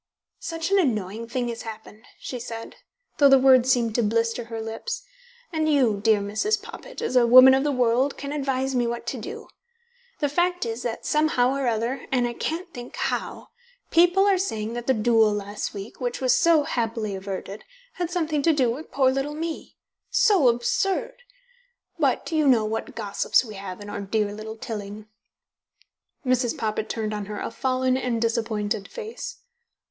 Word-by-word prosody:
"Such 330 +2 -4
an 395 - +5
annoying 220 - -1
thing 245 +1 -2
has 230 -1 -5
happened," 220 0 -10
she 250 - -6
said, 230 -1 -7 0.4
though 285 -1 +7
the 270 - +8
words 260 -1 +5
seemed 235 -3 +2
to 240 - +2
blister 230 +2 0
her 225 -1 -6
lips. 225 - -5 0.5
"And 315 -1 +1
you, 240 -8 +2
dear 215 -2 +4
Mrs. 215 - 0
Poppit, 460 +3 -9
as 255 - -2
a 240 -2 +5
woman 255 +2 +9
of 265 +1 +2
the 295 - +1
world, 250 +1 +1
can 280 0 -5
advise 270 -2 -1
me 245 -2 +1
what 235 0 -4
to 245 +1 -4
do. 445 - -8 0.7
The 290 - 0
fact 350 +2 0
is 230 +1 -4
that 235 -2 -4
somehow 300 -5 +2
or 275 -2 -1
other, 235 +3 -1
and 250 -2 +2
I 240 - -4
can't 335 +8 -4
think 245 0 -9
how, - - -3 0.4
people 355 +3 +5
are 395 -2 +3
saying 225 - -2
that 240 0 -5
the 265 - +3
duel 220 -1 +4
last 205 0 -4
week, 200 +6 -8
which 245 -1 -2
was 255 -2 +3
so 335 -3 +4
happily 225 -5 -2
averted, 195 +1 -6 0.3
had 350 -2 -3
something 320 -4 -1
to 325 +3 +3
do 260 -5 +2
with 290 +7 -7
poor 265 -2 +3
little 275 +3 -2
me. 325 +1 -5 0.3
So 395 - +4
absurd! 385 - +1 0.9
But - - +1
you 310 -2 +2
know 235 -5 +4
what 220 +1 -4
gossips 205 +5 +1
we 215 - -9
have 195 -1 -7
in 205 - -9
our 205 - -5
dear 205 +1 -1
little 220 +1 -7
Tilling." 210 -1 -7 1.2
Mrs. 250 -2 +1
Poppit 215 -1 -2
turned 215 -2 -2
on 210 -1 -4
her 210 0 -5
a - - -4
fallen 255 +1 0
and 250 -3 -1
disappointed 220 -3 -1
face. 480 +1 -7
245 Hz, 180 wpm, -24 LUFS, 220-295 Hz, 1.2 s, woman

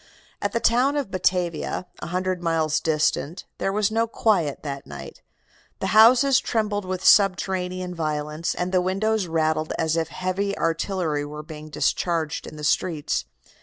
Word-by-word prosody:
"At 205 - -1
the 230 - 0
town 250 +5 +3
of 275 -9 -3
Batavia, 180 -2 -1
a - - -6
hundred 185 +1 -2
miles 160 -2 +1
distant, 155 +1 0
there 195 - 0
was 210 +1 +1
no 225 +1 +1
quiet 195 -10 0
that 140 -2 -6
night. - - -9 0.6
The - - -2
houses 250 +5 +7
trembled 210 -3 -1
with 185 0 -4
subterranean 185 -2 +3
violence, 155 0 -2
and 180 +1 -2
the 185 -1 +3
windows 195 +2 0
rattled 155 -1 0
as 160 -1 0
if 165 -1 0
heavy 185 +4 -2
artillery 165 -2 -1
were 150 +1 -7
being 155 0 -10
discharged 160 +1 -1
in - - -9
the 150 - -8
streets. 150 - 0
180 Hz, 155 wpm, -24 LUFS, 155-200 Hz, 0.6 s, houses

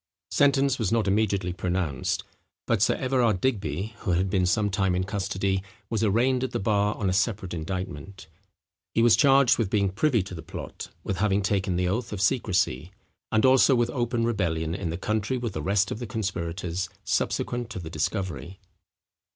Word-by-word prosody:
Sentence 140 -1 +3
was 110 -5 0
not 115 -3 +1
immediately 100 -3 +1
pronounced; 90 -7 -2 0.4
but 115 -4 +1
Sir - - +4
Everard 125 -7 +1
Digby, 100 - -1
who 95 -6 -1
had 90 +2 +1
been 95 -3 +2
some 105 +3 +1
time 95 -1 +1
in 90 - 0
custody, 95 0 -1 0.3
was 115 -1 0
arraigned 125 +5 +2
at 130 - -1
the - - 0
bar 105 0 +1
on 100 - -2
a 95 - +1
separate 100 -2 0
indictment. 90 +1 -5 0.7
He 115 - +4
was 120 -2 +7
charged 135 -3 +5
with 110 -5 +1
being 100 -1 +2
privy 115 0 +2
to 95 - -9
the 80 - -6
plot,—with 90 +3 -7
having 100 +1 +1
taken 95 -2 0
the 90 0 +1
oath 110 +5 -2
of 105 - -4
secresy,—and 95 - -1
also 130 +1 +6
with 120 0 +1
open 120 -2 -1
rebellion 85 -8 -1
in 90 -2 -3
the 85 - -3
country 110 +5 -1
with 120 -4 -3
the 75 - -3
rest 100 +4 +1
of - - -4
the 120 - -5
conspirators, 90 -4 -3 0.2
subsequent 120 -1 -1
to 120 - -7
the 80 -3 -6
discovery. 95 +3 -3
100 Hz, 175 wpm, -26 LUFS, 90-115 Hz, 0.7 s, was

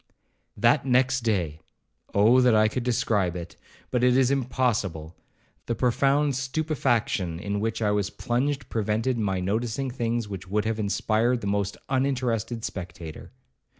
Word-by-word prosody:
'That - - +4
next 130 0 +2
day—Oh! 100 - 0
that 125 -3 +5
I 110 0 +5
could 125 +4 -2
describe 115 -7 0
it!—but 90 +7 -6
it 125 0 +5
is 130 -1 +3
impossible—the 115 - -3
profound 135 +4 +2
stupefaction 130 - -1
in 100 +1 -2
which 115 +1 -2
I 105 - +2
was 105 -1 0
plunged 130 +4 -1
prevented 110 +3 -1
my 95 -3 0
noticing 115 +7 -1
things 120 -2 -2
which 95 -2 -7
would 105 +3 0
have 110 0 -1
inspired 110 +4 +1
the - - -5
most 100 -1 -1
uninterested 125 -4 -1
spectator. 85 -4 -7
115 Hz, 130 wpm, -26 LUFS, 100-125 Hz, -, that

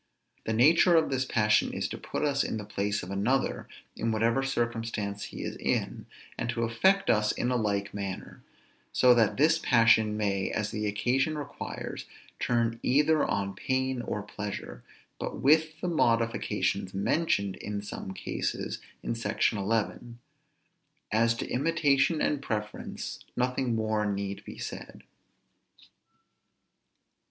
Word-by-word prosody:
The 110 - 0
nature 160 +9 +5
of 160 -3 +3
this 130 -1 0
passion 105 -3 +2
is, - - -1
to - - -5
put - - -4
us 140 -1 +2
in - - -2
the 105 - -6
place 100 -1 -2
of 90 - -7
another 115 +8 0 0.3
in 115 - -1
whatever 115 +4 +2
circumstance 115 -5 -2
he - - -7
is - - -4
in, - - -2 0.3
and 120 - -2
to 115 0 -1
affect 190 +13 +3
us 105 -1 +2
in 125 - -1
a - - +1
like 100 -3 -1
manner; 100 -2 -6 0.5
so 125 -1 +6
that 115 -4 +2
this 160 +3 +4
passion 115 -5 +4
may, 100 -2 0
as 105 -1 -2
the 105 0 -2
occasion 130 +9 +1
requires, 145 - -6 0.3
turn 115 -1 0
either 150 +3 +3
on 100 0 -1
pain 130 +4 -1
or 105 -3 -3
pleasure; 105 -1 -6 0.4
but - - -4
with 155 +2 +3
the 180 - -1
modifications 115 - 0
mentioned 100 - +1
in 100 0 -5
some 100 -2 -6
cases 95 - -3 0.2
in - - -1
Sect. 115 0 0
11. 115 +3 -2 0.9
As 115 +2 +3
to - - -4
imitation 150 +1 +2
and 145 -2 +1
preference, 105 -5 -4 0.2
nothing 125 -1 0
more 110 -1 0
need 100 0 -4
be - - -9
said. - - -7
115 Hz, 140 wpm, -29 LUFS, 105-135 Hz, 0.9 s, so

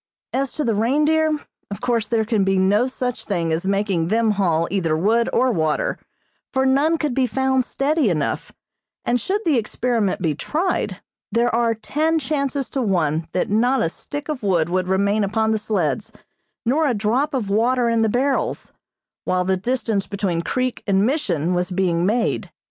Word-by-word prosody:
As 270 0 0
to 305 - -2
the 230 - +1
reindeer, 300 +8 +2 0.3
of 200 - -6
course 235 -3 0
there 225 -1 +1
can 215 -3 +1
be 195 0 +2
no 205 +6 +3
such 250 -2 -3
thing 170 -5 -1
as 170 +4 -2
making 195 -4 0
them 220 +3 +2
haul 170 -5 +1
either 170 -5 0
wood 225 +7 +2
or 255 0 +2
water, 155 -7 0 0.5
for 265 -1 +1
none 285 +5 +3
could 300 -5 -1
be 260 0 +2
found 265 +1 +1
steady 280 0 +1
enough, 155 -5 -2 0.5
and 245 0 +1
should 400 - -1
the 295 -7 +3
experiment 225 -2 -1
be 160 -4 0
tried, 320 - -2 0.3
there 235 +1 +1
are 230 -1 +2
ten 310 +8 0
chances 280 -2 -1
to 270 - -1
one 165 -7 0
that 185 - -1
not 245 +5 +2
a 165 - +1
stick 290 - -7
of 300 -4 -3
wood 175 -6 +1
would 185 0 0
remain 200 +3 +2
upon 220 +2 +1
the 220 - +1
sleds, 205 -5 -1 0.5
nor 295 +6 +2
a 250 - +1
drop 235 +8 0
of 215 -6 -2
water 240 +3 +2
in 230 -1 +2
the 220 - +2
barrels, 265 +5 -1 0.5
while 185 0 +1
the 190 +1 +2
distance 215 -1 -1
between 195 -4 -1
creek 255 +7 -2
and 195 0 +3
Mission 185 - 0
was 180 +1 0
being 180 -2 +1
made. 230 +3 0
220 Hz, 180 wpm, -21 LUFS, 190-260 Hz, 0.5 s, no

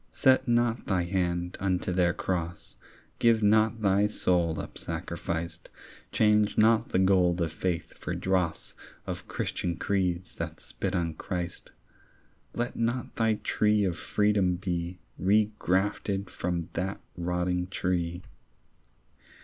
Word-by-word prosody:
Set 130 0 +4
not 120 0 +1
thine 90 -3 0
hand 90 -1 -1
unto 90 -1 0
their 90 -1 +3
cross. 85 -1 -3 0.4
Give 115 -2 +4
not 110 +1 +3
thy 100 +1 +4
soul 85 -6 +1
up - - -7
sacrificed. 85 0 -4 0.4
Change 105 -1 +3
not 110 +1 +4
the - - +1
gold 90 -2 +4
of 85 -2 0
faith 85 0 -2
for - - -5
dross 90 -3 -1 0.3
Of - - -5
Christian 85 -1 -2
creeds 90 -3 -1
that - - -5
spit 95 -1 -4
on 85 -2 0
Christ. 90 +1 -5 0.8
Let 120 +1 -2
not 120 +2 -2
thy 110 -1 +2
tree 105 -1 +2
of 90 -3 0
freedom 100 -2 +2
be 90 -1 -3 0.2
Regrafted 100 -1 +1
from 85 -2 -3
that 95 +3 -2 0.2
rotting 90 +1 -1
tree. 90 -2 -2
95 Hz, 125 wpm, -28 LUFS, 90-105 Hz, 0.8 s, Set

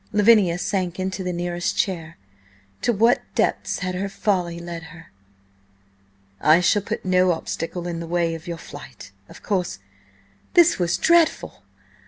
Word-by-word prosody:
Lavinia 210 -5 +4
sank 180 -1 -2
into 190 +1 -3
the 180 - -2
nearest 175 0 -2
chair. 165 -5 -2 0.6
To - - +2
what 230 +2 +3
depths - - 0
had 185 - -2
her 195 +2 -3
folly 180 -4 -1
led 170 -1 -7
her? 165 0 -14 1.3
"I 155 +2 +5
shall 205 +3 +3
put 195 - -5
no 185 0 +3
obstacle 170 +1 -5
in 170 -1 -4
the 170 - -6
way 170 -1 0
of 165 0 -8
your 170 -1 -4
flight, 135 -10 -11 0.2
of - - -14
course.. 180 - -1 0.4
." 95 +1 -35
This 345 - +5
was 175 -1 +1
dreadful! 335 - +2
175 Hz, 155 wpm, -23 LUFS, 165-195 Hz, 1.3 s, I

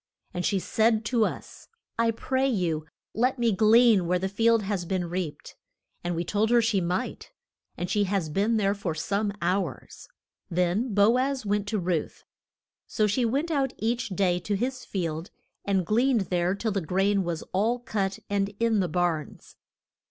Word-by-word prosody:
And 180 - -3
she 200 - +1
said 220 +3 +1
to 230 -1 +2
us, - - -7 0.3
I 230 0 +3
pray 260 +4 0
you 165 -9 -1 0.3
let 250 +4 +1
me 235 -2 +2
glean 215 -2 +5
where 180 +1 +2
the 190 +2 -2
field 225 +2 +3
has 195 -2 -2
been 180 0 -2
reaped. 175 -3 -5 0.5
And 175 0 -2
we 170 - -1
told 210 +4 0
her 240 0 +5
she 220 -4 +2
might, 180 +8 -3 0.5
and 180 - -3
she 205 +2 +1
has 190 -4 -1
been 205 +9 +1
there 200 -2 +2
for 195 -6 -4
some 200 +6 -1
hours. 180 -5 -2 0.4
Then 180 +8 0
Bo 215 +5 +5
az 265 -2 -1
went 205 0 0
to 215 - -1
Ruth. 175 -4 -2 0.6
So 215 - +1
she 225 +4 +1
went 280 +9 0
out 275 -3 0
each 235 +1 -1
day 185 -2 +1
to 205 +3 -2
his 255 +5 -2
field, 165 -3 -3 0.4
and 190 -3 +1
gleaned 235 +4 +2
there 180 +1 +1
till 220 +2 -2
the 195 -1 -1
grain 195 +4 +1
was 170 -2 -3
all 220 +6 +2
cut 200 -6 -2
and 200 0 -1
in 230 -2 +2
the 180 -2 0
barns. 165 -3 -2
200 Hz, 175 wpm, -27 LUFS, 180-230 Hz, 0.6 s, glean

